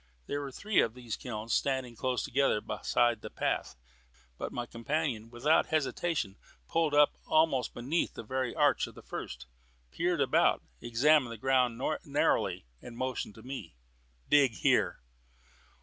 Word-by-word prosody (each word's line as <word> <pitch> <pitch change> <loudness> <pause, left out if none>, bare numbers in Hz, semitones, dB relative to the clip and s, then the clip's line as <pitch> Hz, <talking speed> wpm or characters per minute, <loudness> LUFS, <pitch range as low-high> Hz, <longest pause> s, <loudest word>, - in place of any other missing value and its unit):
There 145 - -3
were 140 -1 -5
three 210 +10 0
of 115 - +2
these 120 -4 -5
kilns 110 -2 -5
standing 130 -3 0
close 125 +2 -1
together 135 -4 +2
beside 120 0 +1
the - - -7
path; - - -2 0.6
but - - -5
my 120 - -3
companion 120 -1 -2
without 125 +7 +2
hesitation 155 - -1 0.3
pulled 160 - +1
up 145 0 +6
almost 155 -5 +2
beneath 140 +8 -1
the - - -6
very 130 +2 -2
arch - - +3
of - - -13
the - - -12
first, 65 +1 -6 0.5
peered 175 - 0
about, 140 - +3 0.2
examined 125 +2 +3
the 115 - -6
ground 125 -1 +2 0.2
narrowly, - - +1 0.2
and 120 - -9
then - - -12
motioned 130 -4 -3
to 110 - -13
me. 125 - -7 0.5
"Dig 140 -5 +5
here." 60 - +1
130 Hz, 150 wpm, -31 LUFS, 115-145 Hz, 0.6 s, up